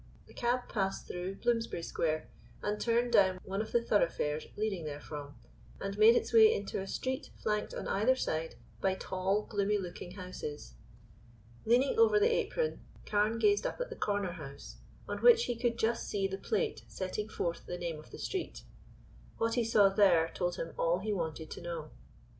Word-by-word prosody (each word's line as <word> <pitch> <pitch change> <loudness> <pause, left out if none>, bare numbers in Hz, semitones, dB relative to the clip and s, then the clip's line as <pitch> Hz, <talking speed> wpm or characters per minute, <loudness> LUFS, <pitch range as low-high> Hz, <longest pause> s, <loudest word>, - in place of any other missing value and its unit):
The - - -17
cab 245 0 0
passed 195 -3 -2
through 180 +2 -4
Bloomsbury 230 -6 -1
Square, 155 -1 -1 0.4
and 210 0 -1
turned 240 +1 +1
down 190 -3 +5
one 195 +2 -2
of 220 - -6
the 235 - +2
thoroughfares 155 -8 +1
leading 205 -5 -1
therefrom, 145 -1 -7 0.4
and 195 0 -4
made 215 +3 +7
its - - 0
way 220 -1 +8
into 200 -1 -2
a 195 - -6
street 260 +6 -3
flanked 210 0 -2
on - - -4
either 225 +6 +3
side 160 -9 -2 0.3
by 190 -1 +2
tall, 190 +2 -1
gloomy 205 0 0
looking 180 -1 -6
houses. 180 - -7 0.9
Leaning 260 - +3
over 445 -2 +6
the 455 +3 +4
apron, 470 0 -1 0.3
Carne 210 +2 +1
gazed 410 - +3
up - - -6
at - - -3
the - - -5
corner 200 -3 -1
house, 145 -5 -9 0.3
on - - -3
which 475 -1 +6
he 240 - -1
could 235 0 0
just 230 +1 0
see 195 -1 0
the 195 0 -5
plate 445 - -1
setting 205 +3 -4
forth 170 -5 -3
the 180 - -4
name 170 -3 -4
of 155 - -14
the - - -10
street. 380 -2 -4 0.7
What 230 0 +1
he 240 - +2
saw 210 -3 +5
there 190 -5 +4
told 175 -1 -1
him 165 - -5
all 170 +1 +3
he 210 +3 -2
wanted 160 -4 -4
to - - -6
know. 170 -3 -5
200 Hz, 180 wpm, -32 LUFS, 175-230 Hz, 0.9 s, way